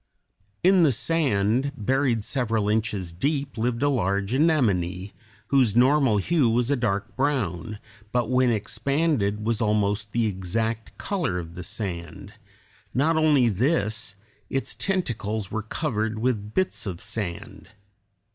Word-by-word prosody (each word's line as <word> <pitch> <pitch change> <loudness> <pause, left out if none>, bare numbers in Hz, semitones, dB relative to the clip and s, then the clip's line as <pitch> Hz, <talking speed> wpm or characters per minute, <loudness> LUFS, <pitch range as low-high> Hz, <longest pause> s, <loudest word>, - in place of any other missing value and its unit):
In 185 0 +5
the 155 -4 +5
sand, 130 -3 +1
buried 125 0 +1
several 115 -5 0
inches 105 -5 -1
deep, 140 - -2
lived 120 +2 -1
a - - +4
large 100 -4 0
anemone, 100 - +1 0.4
whose 130 -7 +3
normal 130 -2 +4
hue 140 - +2
was 120 +3 +1
a - - +4
dark 110 -3 -2
brown, 110 - -1 0.3
but 120 -2 +1
when 130 0 +3
expanded 110 -1 0
was 115 0 0
almost 105 -1 0
the 115 +1 +1
exact 110 +3 -2
color 175 - -2
of 85 -1 -6
the 90 - -7
sand; 85 -6 -6 0.6
not 155 +6 +3
only 150 -6 +4
this, 110 - 0 0.3
its 135 - -2
tentacles 110 - -2
were 110 - -2
covered 110 -2 -2
with 110 -3 -2
bits 185 - 0
of 90 -3 -4
sand. 100 -4 -5
115 Hz, 130 wpm, -25 LUFS, 100-135 Hz, 0.6 s, In